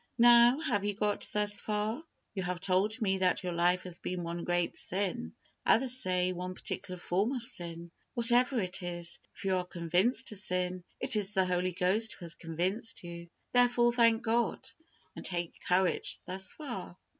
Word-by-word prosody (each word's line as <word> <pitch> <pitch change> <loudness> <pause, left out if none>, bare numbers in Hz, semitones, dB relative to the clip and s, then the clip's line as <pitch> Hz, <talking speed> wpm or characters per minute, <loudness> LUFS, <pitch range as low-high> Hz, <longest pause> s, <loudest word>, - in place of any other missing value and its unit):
Now, 240 +2 +7
have 240 -11 0
you 205 -1 -1
got 210 0 0
thus 205 -1 +1
far? 215 +7 -2 0.3
You 195 - -3
have 180 -1 -3
told 195 +5 +1
me 190 -2 +1
that 185 0 +1
your 180 -1 -2
life 175 +2 +2
has 175 -2 -4
been 180 -1 -4
one 170 0 -4
great 175 -1 0
sin; 180 - -2 0.3
others 250 +1 +4
say, 185 -2 +1
one 180 +1 -5
particular 180 0 -4
form 195 +8 0
of 250 -3 -4
sin. 170 -5 -7 0.2
Whatever 245 +2 +4
it 190 -1 -2
is, 175 -1 -2 0.2
if - - -9
you 190 -1 +2
are 180 - -1
convinced 180 +8 +1
of 210 - -3
sin, 180 -1 -1 0.2
it 255 -2 +1
is 210 -1 +1
the 190 -1 +3
Holy 180 0 0
Ghost 195 +6 +1
who 175 - -10
has 165 - 0
convinced 180 +9 -2
you; 170 0 -8 0.2
therefore, 245 -1 +4
thank 230 -2 +4
God, 235 +1 0 0.5
and - - -8
take 175 -2 -4
courage 180 0 +1
thus 190 +1 -3
far. 240 - -7
190 Hz, 180 wpm, -31 LUFS, 180-225 Hz, 0.5 s, Now